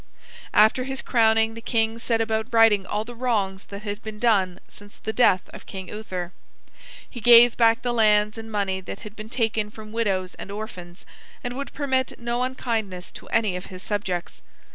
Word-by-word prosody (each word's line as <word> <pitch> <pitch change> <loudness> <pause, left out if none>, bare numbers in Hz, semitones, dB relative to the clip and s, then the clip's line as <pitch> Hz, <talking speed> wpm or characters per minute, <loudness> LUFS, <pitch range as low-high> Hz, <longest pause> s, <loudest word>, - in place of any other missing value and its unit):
After 220 +4 +5
his 270 0 -4
crowning 225 -2 +3
the 230 - -9
king 225 0 0
set 230 -1 0
about 220 +1 -1
righting 225 -4 +5
all 210 - -1
the 240 - -8
wrongs 210 -6 -1
that 200 +1 -9
had 205 -1 -5
been 215 0 -7
done 195 -6 +2
since 205 0 -15
the 220 - -4
death 190 -7 +3
of - - -11
King 190 -2 -7
Uther. 185 -5 -5 0.8
He 240 - -9
gave 235 +1 +8
back 230 -1 +3
the 245 -1 0
lands 210 -2 +3
and 225 0 -8
money 195 -3 -1
that - - -8
had 210 0 -10
been 215 0 -9
taken 220 -3 0
from 215 0 -11
widows 195 -5 -1
and - - -9
orphans, 195 -4 -8 0.4
and 245 0 -4
would 280 +1 -5
permit 265 -3 -1
no 240 +1 -2
unkindness 225 -8 -3
to - - -12
any 215 -5 +1
of 180 - -6
his 185 -1 -10
subjects. 190 -4 -3
220 Hz, 185 wpm, -24 LUFS, 200-230 Hz, 0.8 s, gave